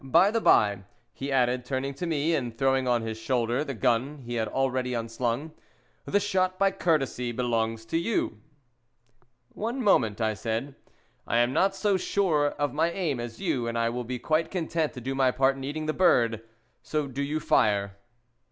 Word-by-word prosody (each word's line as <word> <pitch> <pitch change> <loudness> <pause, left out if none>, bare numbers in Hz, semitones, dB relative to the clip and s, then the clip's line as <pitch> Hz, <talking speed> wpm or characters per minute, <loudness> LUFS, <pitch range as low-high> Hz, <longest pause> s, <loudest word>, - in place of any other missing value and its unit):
"By 170 +9 +4
the 230 0 0
by," 100 - +4 0.3
he 140 +1 -5
added, 125 -1 +2
turning 135 +2 -3
to 175 +6 -4
me 160 0 +1
and 120 -6 -2
throwing 135 -1 +2
on 120 -2 +2
his 110 0 -5
shoulder 120 +3 0
the 140 -3 -5
gun 125 +5 +1
he 120 - -5
had 115 -2 -1
already 130 0 -1
unslung, 115 +5 -2 0.5
"the 205 - +2
shot 185 -2 0
by 195 0 +3
courtesy 150 -9 0
belongs 115 -2 -1
to 165 +9 -1
you." 170 - -1 1.1
"One 235 +5 -4
moment," 115 - +3
I 110 -1 +1
said. 115 +6 -3 0.5
"I 115 - +1
am 120 +2 +3
not 195 +5 +2
so 200 0 +1
sure 170 -6 +1
of 145 0 -2
my 160 +3 +2
aim 170 -8 -2
as 120 -1 -6
you, 150 -11 -1
and 115 0 -2
I 115 0 +1
will 125 +1 -3
be 125 +1 -4
quite 155 +6 0
content 165 -3 -1
to 125 - -8
do 135 +3 -3
my 135 -1 +3
part 130 +1 +2
in 135 - -8
eating 150 +3 -4
the 155 - 0
bird. 115 -11 +3 0.4
So 150 -1 -2
do 135 0 -5
you 145 +2 -1
fire." 100 -8 +2
135 Hz, 190 wpm, -27 LUFS, 120-160 Hz, 1.1 s, By